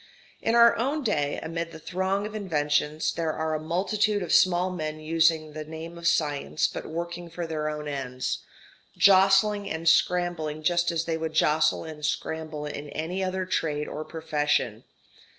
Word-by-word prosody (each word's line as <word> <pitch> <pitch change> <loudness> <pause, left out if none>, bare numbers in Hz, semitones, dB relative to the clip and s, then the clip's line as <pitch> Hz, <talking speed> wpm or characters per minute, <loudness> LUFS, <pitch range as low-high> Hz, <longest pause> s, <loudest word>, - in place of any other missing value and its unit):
In 225 - +1
our 235 0 +7
own 280 +6 -1
day, 145 - 0
amid 165 +1 -4
the 160 - -9
throng 190 +5 -1
of 210 - -6
inventions, 150 -6 0
there 165 -2 -1
are 160 0 -2
a 155 - -1
multitude 200 +5 0
of 170 - -2
small 180 0 +4
men 155 -3 -4
using 160 0 +2
the 155 0 -5
name 160 +2 -8
of 170 0 -3
science 150 -2 +1
but - - -3
working 170 +1 -5
for 170 +1 -5
their 155 -2 -2
own 150 0 -5
ends, 130 -3 -3 0.6
jostling 195 +1 +5
and 160 +1 -4
scrambling 165 -3 +2
just 175 +1 +2
as 165 0 -1
they 165 -1 -1
would 160 -1 -4
jostle 155 0 +3
and 155 -2 -9
scramble 155 0 -3
in 145 0 -6
any 175 +6 -3
other 185 0 -2
trade 150 -5 -1
or 155 - -5
profession. 150 -8 -1
160 Hz, 170 wpm, -26 LUFS, 155-180 Hz, 0.6 s, our